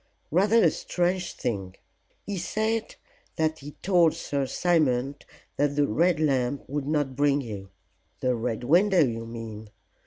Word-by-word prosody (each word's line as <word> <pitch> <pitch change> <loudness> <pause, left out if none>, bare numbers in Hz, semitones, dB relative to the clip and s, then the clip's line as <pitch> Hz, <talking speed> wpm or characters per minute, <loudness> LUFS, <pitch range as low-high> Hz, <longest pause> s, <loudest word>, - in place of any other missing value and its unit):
"Rather 205 +8 +4
a 165 - +5
strange 180 +1 -1
thing. 95 -6 -4 0.5
He 200 -2 -3
said 220 +5 -1 0.4
that 160 0 0
he 145 +1 -9
told 175 -4 +4
Sir 140 -4 -2
Simon 140 -6 +1 0.4
that 145 0 +1
the 145 0 +3
Red 170 +8 +2
Lamp 135 -3 0
would 145 0 -3
not 145 -3 0
bring 145 0 +3
you." 100 -6 -7 0.5
"The 130 -1 +1
Red 115 0 -3
Window, 175 +6 +4
you 115 -2 -4
mean. 110 -2 -8
145 Hz, 145 wpm, -26 LUFS, 125-175 Hz, 0.5 s, a